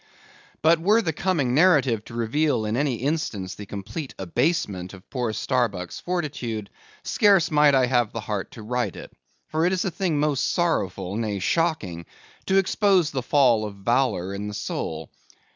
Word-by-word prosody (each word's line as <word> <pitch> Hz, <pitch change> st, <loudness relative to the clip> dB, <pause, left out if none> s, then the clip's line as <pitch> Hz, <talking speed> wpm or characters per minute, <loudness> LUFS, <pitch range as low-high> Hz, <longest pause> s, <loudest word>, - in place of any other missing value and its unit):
But 165 Hz, +1 st, +5 dB
were 215 Hz, +6 st, +4 dB
the 160 Hz, -3 st, -1 dB
coming 150 Hz, -8 st, 0 dB
narrative 135 Hz, -, +4 dB
to 115 Hz, -, -10 dB
reveal 120 Hz, +1 st, +1 dB
in 105 Hz, +1 st, -1 dB
any 140 Hz, -1 st, +1 dB
instance, 115 Hz, -, -2 dB
the 105 Hz, -, -9 dB
complete 105 Hz, +10 st, -6 dB
abasement 95 Hz, -, -1 dB
of 95 Hz, -, -16 dB
poor 125 Hz, -4 st, -1 dB
Starbuck's 110 Hz, -7 st, -1 dB
fortitude, 135 Hz, -, -3 dB, 0.3 s
scarce 200 Hz, -6 st, +3 dB
might 150 Hz, -2 st, +5 dB
I 130 Hz, -1 st, +4 dB
have 120 Hz, -3 st, +1 dB
the 115 Hz, -, -5 dB
heart 105 Hz, -2 st, -4 dB
to 115 Hz, -, -10 dB
write 120 Hz, -3 st, -2 dB
it; -, -, -10 dB, 0.4 s
for 155 Hz, +1 st, 0 dB
it 175 Hz, -, +3 dB
is 185 Hz, -, 0 dB
a 190 Hz, -, -1 dB
thing 170 Hz, -5 st, -1 dB
most 145 Hz, -3 st, +1 dB
sorrowful, 100 Hz, -, -1 dB
nay 110 Hz, -3 st, -2 dB
shocking, 95 Hz, -, -1 dB, 0.4 s
to 190 Hz, -, +3 dB
expose 195 Hz, -3 st, +3 dB
the 130 Hz, -, -2 dB
fall 125 Hz, -4 st, +3 dB
of 105 Hz, -2 st, -5 dB
valour 100 Hz, -3 st, 0 dB
in 100 Hz, +1 st, -4 dB
the 105 Hz, -, -5 dB
soul. -, -, -4 dB
125 Hz, 170 wpm, -24 LUFS, 105-160 Hz, 0.4 s, But